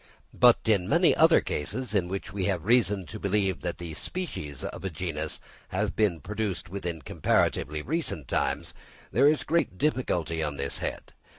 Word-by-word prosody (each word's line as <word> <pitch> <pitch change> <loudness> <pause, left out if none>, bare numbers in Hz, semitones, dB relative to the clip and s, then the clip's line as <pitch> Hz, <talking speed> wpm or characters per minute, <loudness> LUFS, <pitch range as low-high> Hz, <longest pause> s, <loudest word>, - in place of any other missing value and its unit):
But 120 -1 +6
in 100 -4 +2
many 170 +2 +4
other 160 +1 +6
cases, 110 - -3
in 95 -4 +2
which 95 +2 -5
we 100 -2 -1
have 90 -5 -1
reason 105 -5 +3
to 110 - -8
believe 100 -2 0
that 90 -1 -3
the 85 -2 -6
species 75 - -5
of - - -6
a 95 - -1
genus 80 -2 -3 0.3
have - - -1
been 95 -7 +1
produced 105 0 -3
within 85 -5 -4
comparatively 75 +3 +1
recent 100 - -2
times, - - -1 0.4
there 140 - +5
is 150 0 +3
great 165 - 0
difficulty 85 - 0
on 75 -2 -2
this - - -2
head. - - -5
95 Hz, 170 wpm, -28 LUFS, 85-115 Hz, 0.4 s, But